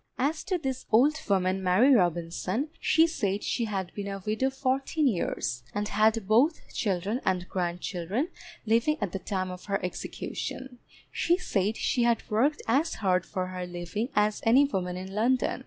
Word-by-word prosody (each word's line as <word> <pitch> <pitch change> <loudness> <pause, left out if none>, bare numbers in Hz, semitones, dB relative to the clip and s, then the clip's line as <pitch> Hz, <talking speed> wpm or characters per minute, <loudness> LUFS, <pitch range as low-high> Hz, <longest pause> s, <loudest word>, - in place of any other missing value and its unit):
As 300 +4 0
to 370 - 0
this 265 -5 -4
old 270 +8 +5
woman 190 -1 +2
Mary 190 +9 +5
Robinson, 180 - 0
she 325 +1 +4
said 205 - -1
she 235 - 0
had 195 -4 -3
been 200 -1 -5
a 195 -1 -5
widow 220 +5 +1
fourteen 270 +3 0
years, 170 - -1
and 205 +1 -1
had 215 -1 +2
both 255 +10 +2
children 200 +4 -1
and 185 -1 0
grandchildren 180 - -2 0.4
living 235 +8 +2
at 205 -4 -2
the 195 - -3
time 185 -1 -3
of 180 0 -9
her 200 -1 0
execution; 250 +7 -5 0.3
she 345 +1 +2
said 210 - -1
she 245 - 0
had 235 -1 +2
worked 270 +8 +2
as 280 +8 +2
hard 185 -3 +1
for 185 -2 -2
her 180 -1 -5
living 175 +7 -4
as 210 0 +2
any 255 +5 +6
woman 180 -9 -2
in 190 +1 -7
London. 245 +6 +1
210 Hz, 170 wpm, -28 LUFS, 185-260 Hz, 0.4 s, any